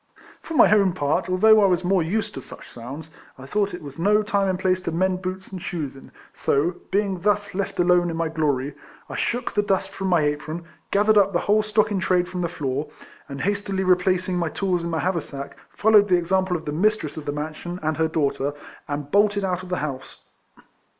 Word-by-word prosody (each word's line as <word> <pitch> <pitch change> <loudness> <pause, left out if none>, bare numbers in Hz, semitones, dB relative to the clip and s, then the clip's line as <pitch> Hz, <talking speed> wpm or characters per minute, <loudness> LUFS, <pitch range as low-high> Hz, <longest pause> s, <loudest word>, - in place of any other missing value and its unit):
For 325 - -7
my 215 - +6
own 195 -3 +3
part, 145 0 0
although 215 +4 +6
I 200 - +5
was 180 -1 +1
more 185 0 +2
used 200 +7 -1
to 135 - -6
such - - -11
sounds, 140 +7 -9 0.3
I 135 - -10
thought 200 +6 -1
it 175 - -10
was 140 +1 -9
no 210 +4 +3
time 200 -2 +1
and 185 - 0
place 185 0 +1
to 170 - -3
mend 185 +2 0
boots 190 0 -5
and 185 -2 -6
shoes 150 -7 -4
in, 135 - -14 0.2
so, 160 +6 0
being 195 -1 0
thus 205 +1 0
left 195 0 -3
alone 175 0 +4
in 165 - -4
my 165 0 0
glory, 145 -4 -1 0.4
I - - -6
shook 245 +1 -1
the 205 - +2
dust 195 -2 0
from 195 - -4
my 175 -3 +3
apron, 150 +3 -2 0.3
gathered 210 +1 +4
up 200 0 +2
the 175 - +1
whole 210 +1 +3
stock 215 0 +1
in 200 - 0
trade 180 -1 +1
from 180 0 -4
the 170 - -1
floor, 145 -3 -3 0.4
and 140 -1 -6
hastily 200 0 -1
replacing 185 0 +2
my 170 -2 0
tools 180 -1 -1
in 170 - -3
my 165 - -1
haversack, 160 -6 -3
followed 210 -1 +4
the 180 - +5
example 185 +1 +1
of 160 - -11
the 150 - -3
mistress 170 -2 0
of 155 - -7
the 145 - -1
mansion 155 +4 -5
and 155 0 0
her 160 0 +2
daughter, 145 -2 -1 0.3
and 145 0 -4
bolted 205 0 +3
out 185 -1 -1
of 185 - -10
the 180 - -1
house. 135 -3 -8
180 Hz, 220 wpm, -23 LUFS, 155-195 Hz, 0.4 s, my